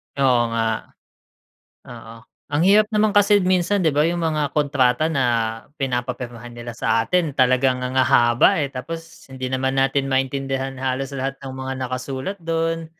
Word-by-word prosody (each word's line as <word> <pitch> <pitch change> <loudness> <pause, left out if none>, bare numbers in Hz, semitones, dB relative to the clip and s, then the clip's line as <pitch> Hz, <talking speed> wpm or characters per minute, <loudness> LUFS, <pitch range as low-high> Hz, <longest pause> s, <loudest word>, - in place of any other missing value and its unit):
Oo 130 -3 +3
nga, 115 -1 +1 1.2
oo. 115 -2 -11 0.3
Ang 145 +2 0
hirap 205 +4 +5
naman 215 0 +3
kasi 205 0 +4
minsan, 185 +2 +1
'di 160 - +3
ba, 150 +2 +3
yung 170 0 -1
mga 155 -3 0
kontrata 140 -1 +2
na 140 -5 0 0.5
pinapapirmahan 120 -2 -4
nila 120 0 -7
sa 115 0 +2
atin, 160 +4 0
talaga 130 0 +3
ang 125 0 -4
hahaba, 120 0 +4
eh, 140 - -3
tapos 165 +5 -8
hindi 130 -1 -5
naman 130 0 -1
natin 135 +1 +1
maintindihan 135 0 -1
halos 130 +1 -2
lahat 135 0 -3
ng 135 -1 -7
mga 130 0 -5
nakasulat 130 +8 -4
do'n. 165 -1 -2
135 Hz, 150 wpm, -21 LUFS, 125-165 Hz, 1.2 s, hirap